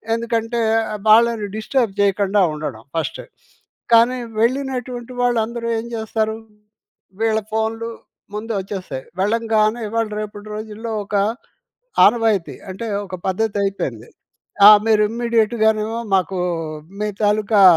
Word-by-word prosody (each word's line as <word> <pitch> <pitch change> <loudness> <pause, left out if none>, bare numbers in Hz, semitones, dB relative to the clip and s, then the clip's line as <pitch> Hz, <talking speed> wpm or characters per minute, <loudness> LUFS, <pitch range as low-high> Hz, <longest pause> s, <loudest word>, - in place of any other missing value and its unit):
ఎందుకంటే 230 0 -1 0.5
వాళ్ళని 225 -1 +5
డిస్టర్బ్ 220 0 0
చేయకుండా 200 0 +2
ఉండడం 145 -7 -6
ఫస్ట్. 160 - -2 0.7
కానీ, 235 +3 +5 0.2
వెళ్ళినటువంటి 250 0 -2
వాళ్ళందరూ 235 -1 0
ఏం 230 - -8
చేస్తారు, 220 0 -1 0.9
వీళ్ళ 220 -1 +2
ఫోన్‌లు 225 +1 -1 0.4
ముందు 220 +2 -4
వచ్చేస్తాయి. 185 -9 -6 0.2
వెళ్ళంగానే 220 +2 +1
ఇవాళ 225 0 0
రేపటి 210 0 -7
రోజుల్లో 220 +1 -6
ఒక 200 - -8 0.9
ఆనవాయితీ 220 -5 +2 0.2
అంటే, 195 +5 -5 0.2
ఒక 190 - -8
పద్ధతైపోయింది. 195 - -2 0.6
ఆ! - - +13 0.2
మీరు 220 -1 +4
ఇమ్మీడియేట్‌గాను 220 -2 +1 0.3
మాకు, 190 0 -1 0.6
మీ 210 - 0 0.2
తాలూకా 210 0 +3
220 Hz, 100 wpm, -20 LUFS, 205-230 Hz, 0.9 s, ఆ